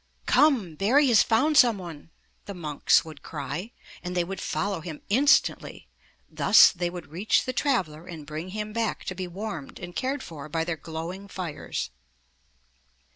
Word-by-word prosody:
Come! 250 Hz, -, +3 dB
Barry 255 Hz, -, +3 dB
has 230 Hz, -, +6 dB
found 280 Hz, +7 st, +2 dB
some 235 Hz, -5 st, +6 dB
one," 165 Hz, -4 st, -9 dB, 0.4 s
the 200 Hz, -, -7 dB
monks 155 Hz, -2 st, +2 dB
would 155 Hz, -3 st, -11 dB
cry, 155 Hz, -, -5 dB, 0.3 s
and 180 Hz, +1 st, -4 dB
they 175 Hz, -, +3 dB
would 190 Hz, +1 st, -6 dB
follow 200 Hz, -3 st, -2 dB
him 160 Hz, -3 st, -8 dB
instantly. 270 Hz, +8 st, +2 dB, 0.4 s
Thus -, -, +6 dB
they 175 Hz, 0 st, -2 dB
would 175 Hz, -4 st, -9 dB
reach 185 Hz, +7 st, +1 dB
the 255 Hz, -, -3 dB
traveler 180 Hz, -, -1 dB
and 160 Hz, -4 st, -8 dB
bring 155 Hz, +4 st, -6 dB
him 210 Hz, +2 st, -5 dB
back 230 Hz, -1 st, -2 dB
to 185 Hz, -, -3 dB
be 185 Hz, 0 st, -5 dB
warmed 180 Hz, -5 st, -6 dB
and 175 Hz, 0 st, -8 dB
cared 270 Hz, +2 st, -2 dB
for 155 Hz, -3 st, -9 dB
by 160 Hz, +2 st, -1 dB
their 165 Hz, 0 st, -2 dB
glowing 165 Hz, +5 st, -7 dB
fires. 165 Hz, -, -5 dB
180 Hz, 165 wpm, -26 LUFS, 160-215 Hz, 0.4 s, has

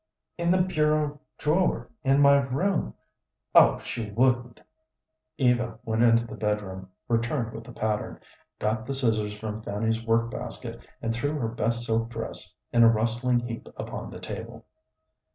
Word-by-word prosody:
"In 170 Hz, 0 st, -1 dB
the 180 Hz, 0 st, +4 dB
bureau 150 Hz, -4 st, +1 dB, 0.2 s
drawer 175 Hz, +5 st, +1 dB
in 135 Hz, +1 st, +4 dB
my 140 Hz, 0 st, +7 dB
room. 145 Hz, +8 st, -1 dB, 0.6 s
Oh, -, -, +7 dB
she 115 Hz, -3 st, -4 dB
wouldn't." 120 Hz, +2 st, +1 dB, 0.8 s
Eva 120 Hz, -3 st, +2 dB
went 110 Hz, 0 st, 0 dB
into 115 Hz, -1 st, +5 dB
the 110 Hz, -, -9 dB
bedroom, 105 Hz, -3 st, -3 dB, 0.2 s
returned 115 Hz, 0 st, 0 dB
with 115 Hz, 0 st, -8 dB
the 125 Hz, -, -10 dB
pattern, 110 Hz, -2 st, -2 dB, 0.4 s
got 110 Hz, +2 st, -1 dB
the 135 Hz, -, -2 dB
scissors 110 Hz, -5 st, 0 dB
from 110 Hz, 0 st, -5 dB
Fanny's 110 Hz, +2 st, -1 dB
work 115 Hz, 0 st, +2 dB
basket, -, -, -6 dB, 0.2 s
and 115 Hz, 0 st, 0 dB
threw 145 Hz, +6 st, -1 dB
her 115 Hz, -5 st, -1 dB
best 115 Hz, +1 st, -1 dB
silk 115 Hz, 0 st, 0 dB
dress 115 Hz, -5 st, -6 dB, 0.2 s
in 120 Hz, -, +5 dB
a 115 Hz, -, +9 dB
rustling 120 Hz, +2 st, +1 dB
heap 115 Hz, -1 st, -6 dB
upon -, -, -5 dB
the -, -, -9 dB
table. -, -, -7 dB
115 Hz, 150 wpm, -27 LUFS, 110-135 Hz, 0.8 s, a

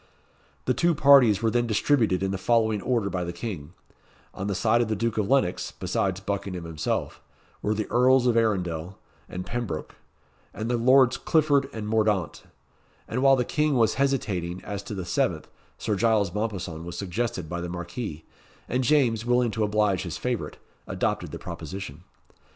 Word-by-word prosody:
The 125 Hz, -, +2 dB
two 170 Hz, +6 st, +2 dB
parties 130 Hz, -8 st, +6 dB
were 115 Hz, -, +2 dB
then 120 Hz, +1 st, +1 dB
distributed 110 Hz, -, +2 dB
in 95 Hz, -, 0 dB
the 95 Hz, -, -3 dB
following 110 Hz, -1 st, +2 dB
order 115 Hz, -4 st, 0 dB
by 90 Hz, -1 st, -2 dB
the 85 Hz, -, -4 dB
King: 85 Hz, -4 st, -6 dB, 0.6 s
On 100 Hz, -, -4 dB
the 100 Hz, -, -1 dB
side 115 Hz, +5 st, +3 dB
of 120 Hz, -, 0 dB
the 110 Hz, -, -1 dB
Duke 110 Hz, +1 st, -1 dB
of 105 Hz, -, -1 dB
Lennox, 135 Hz, -9 st, +1 dB
besides 95 Hz, -1 st, -1 dB
Buckingham 100 Hz, -3 st, -4 dB
himself, 80 Hz, -2 st, -3 dB, 0.4 s
were 105 Hz, +1 st, 0 dB
the 110 Hz, 0 st, -1 dB
Earls 130 Hz, +1 st, +4 dB
of 120 Hz, -2 st, +3 dB
Arundel 90 Hz, -6 st, 0 dB, 0.3 s
and 90 Hz, 0 st, -5 dB
Pembroke, 115 Hz, -10 st, -4 dB, 0.6 s
and 110 Hz, +2 st, -3 dB
the 120 Hz, -, +1 dB
Lords 130 Hz, +1 st, +5 dB
Clifford 145 Hz, -3 st, +2 dB
and 110 Hz, -2 st, -5 dB
Mordaunt; 105 Hz, -6 st, 0 dB, 0.7 s
and 125 Hz, +3 st, -2 dB
while 135 Hz, 0 st, +6 dB
the 125 Hz, -2 st, 0 dB
King 150 Hz, +1 st, +1 dB
was 115 Hz, -3 st, +3 dB
hesitating 100 Hz, -11 st, -1 dB
as 100 Hz, -1 st, -5 dB
to 100 Hz, +1 st, -7 dB
the 95 Hz, -2 st, -4 dB
seventh, -, -, -1 dB, 0.3 s
Sir 105 Hz, -, -1 dB
Giles 105 Hz, -4 st, +2 dB
Mompesson 95 Hz, -7 st, -3 dB
was 85 Hz, +1 st, -7 dB
suggested 100 Hz, -1 st, -3 dB
by 85 Hz, +2 st, -4 dB
the 85 Hz, -, -4 dB
Marquis, 85 Hz, -1 st, -6 dB, 0.4 s
and 125 Hz, +2 st, 0 dB
James, 120 Hz, -5 st, +2 dB
willing 120 Hz, -1 st, +2 dB
to 110 Hz, 0 st, -1 dB
oblige 105 Hz, -3 st, +1 dB
his 85 Hz, -3 st, -5 dB
favourite, 125 Hz, -3 st, -3 dB, 0.3 s
adopted -, -, -1 dB
the -, -, -6 dB
proposition. 90 Hz, -4 st, -7 dB
110 Hz, 175 wpm, -26 LUFS, 95-120 Hz, 0.7 s, parties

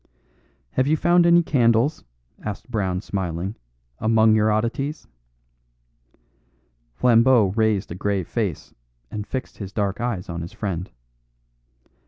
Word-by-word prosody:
"Have 130 Hz, +1 st, +1 dB
you 155 Hz, +2 st, +3 dB
found 175 Hz, +2 st, +4 dB
any 170 Hz, 0 st, +6 dB
candles," 125 Hz, 0 st, +2 dB, 0.4 s
asked 105 Hz, +4 st, -6 dB
Brown 95 Hz, -5 st, -1 dB
smiling, 95 Hz, -1 st, -3 dB, 0.4 s
"among 110 Hz, 0 st, +4 dB
your 110 Hz, 0 st, +3 dB
oddities?" 120 Hz, +8 st, -2 dB, 1.9 s
Flambeau 115 Hz, -, +4 dB
raised 110 Hz, -4 st, +1 dB
a -, -, -2 dB
grave 95 Hz, -1 st, -2 dB
face, 105 Hz, -10 st, -3 dB, 0.4 s
and 105 Hz, -1 st, -5 dB
fixed 130 Hz, 0 st, -5 dB
his 100 Hz, -3 st, -6 dB
dark 100 Hz, 0 st, -2 dB
eyes 120 Hz, -7 st, -2 dB
on 85 Hz, -1 st, -5 dB
his 85 Hz, -, -8 dB
friend. 95 Hz, -3 st, -4 dB
110 Hz, 120 wpm, -23 LUFS, 95-125 Hz, 1.9 s, any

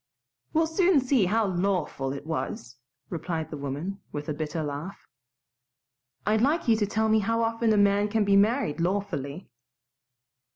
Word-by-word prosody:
"We'll 325 Hz, 0 st, +3 dB
soon 345 Hz, 0 st, +3 dB
see 255 Hz, -5 st, +2 dB
how 220 Hz, +4 st, +2 dB
LAWFUL 180 Hz, -7 st, -1 dB
it 140 Hz, +1 st, -7 dB
was," 130 Hz, -5 st, -4 dB, 0.3 s
replied 165 Hz, -1 st, -3 dB
the 150 Hz, -, -5 dB
woman, 145 Hz, +8 st, -4 dB
with 145 Hz, 0 st, -5 dB
a -, -, 0 dB
bitter 155 Hz, +1 st, -3 dB
laugh. 150 Hz, +7 st, -6 dB, 1.2 s
"I'd 215 Hz, +1 st, +2 dB
like 300 Hz, +5 st, +1 dB
you 230 Hz, -, +5 dB
to 210 Hz, -2 st, 0 dB
tell 220 Hz, +1 st, 0 dB
me 220 Hz, 0 st, +4 dB
how 230 Hz, +2 st, 0 dB
often 230 Hz, 0 st, +1 dB
a 215 Hz, -, +3 dB
man 205 Hz, 0 st, +4 dB
can 210 Hz, 0 st, +1 dB
be 200 Hz, 0 st, +4 dB
married 205 Hz, -, +2 dB
lawfully." 175 Hz, -6 st, -2 dB
200 Hz, 160 wpm, -27 LUFS, 155-225 Hz, 1.2 s, you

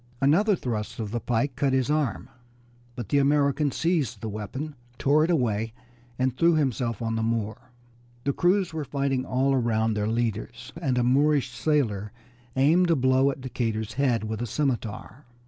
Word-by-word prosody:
Another 180 Hz, +10 st, +4 dB
thrust 115 Hz, -9 st, -4 dB
of 105 Hz, -2 st, -4 dB
the 120 Hz, -, -1 dB
pike 120 Hz, +3 st, -1 dB
cut 140 Hz, -2 st, +1 dB
his 130 Hz, +1 st, +1 dB
arm, 150 Hz, -8 st, -1 dB, 0.7 s
but 120 Hz, -5 st, -6 dB
the 145 Hz, -, +3 dB
American 140 Hz, +1 st, +2 dB
seized 145 Hz, -, 0 dB
the 110 Hz, -, -5 dB
weapon, 110 Hz, +9 st, -5 dB, 0.2 s
tore 145 Hz, +4 st, +3 dB
it 165 Hz, -, 0 dB
away, 115 Hz, -8 st, 0 dB, 0.4 s
and 130 Hz, -1 st, 0 dB
threw 170 Hz, +3 st, +4 dB
himself 125 Hz, -6 st, -1 dB
on 115 Hz, 0 st, -1 dB
the 110 Hz, -, -1 dB
Moor. 115 Hz, +2 st, -2 dB, 0.5 s
The 140 Hz, -, 0 dB
crews 180 Hz, +1 st, +2 dB
were 160 Hz, -1 st, -3 dB
fighting 135 Hz, -2 st, -1 dB
all 135 Hz, +2 st, +1 dB
around 115 Hz, -3 st, +1 dB
their 105 Hz, 0 st, -1 dB
leaders, 115 Hz, 0 st, -3 dB
and 130 Hz, -6 st, 0 dB
a 125 Hz, -, +2 dB
Moorish 140 Hz, +1 st, +2 dB
sailor 115 Hz, -6 st, 0 dB, 0.4 s
aimed 165 Hz, +7 st, +4 dB
a 165 Hz, -, +4 dB
blow 130 Hz, 0 st, +3 dB
at 135 Hz, -1 st, -5 dB
Decatur's 115 Hz, -4 st, -3 dB
head 125 Hz, -4 st, +1 dB
with 110 Hz, +1 st, -4 dB
a 120 Hz, -, -2 dB
scimitar. 125 Hz, 0 st, -3 dB
130 Hz, 170 wpm, -26 LUFS, 115-145 Hz, 0.7 s, Another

